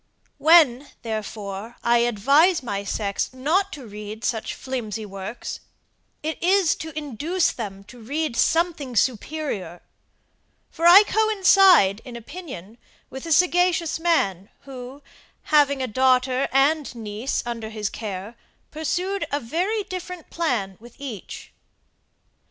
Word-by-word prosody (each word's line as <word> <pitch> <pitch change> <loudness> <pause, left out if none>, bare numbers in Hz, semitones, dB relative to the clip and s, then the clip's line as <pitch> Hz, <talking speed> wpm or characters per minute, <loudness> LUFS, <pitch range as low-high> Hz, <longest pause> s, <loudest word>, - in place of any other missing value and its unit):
When, 290 -5 +5 0.2
therefore, 215 -1 -5
I 235 0 +4
advise 275 - +3
my 200 -4 -3
sex 200 0 -2
not 330 +10 0
to 280 -5 -8
read 210 +1 -8
such 225 -2 -2
flimsy 225 -5 -5
works, 195 +4 -7 0.6
it 315 +1 -4
is 370 -1 +3
to 320 - -7
induce 305 - -1
them 200 -4 -7
to 245 +5 -15
read 285 +3 -3
something 315 -3 +1
superior; 240 - -2 0.9
for 335 +1 +1
I 375 +4 +10
coincide 390 - +5
in 250 -2 -10
opinion 235 - -9 0.3
with 265 +5 -7
a - - -4
sagacious 355 0 +2
man, 200 - +1
who, 265 +1 -10 0.5
having 280 -3 +4
a - - -1
daughter 255 +2 +2
and 280 +1 +2
niece 220 +3 -3
under 230 -2 -5
his 215 -2 -3
care, 205 0 -6 0.4
pursued 360 +6 -2
a 285 - 0
very 360 - -1
different 365 -2 -8
plan 230 - -1
with 240 +1 -15
each. 255 -9 -8
260 Hz, 125 wpm, -23 LUFS, 220-330 Hz, 0.9 s, I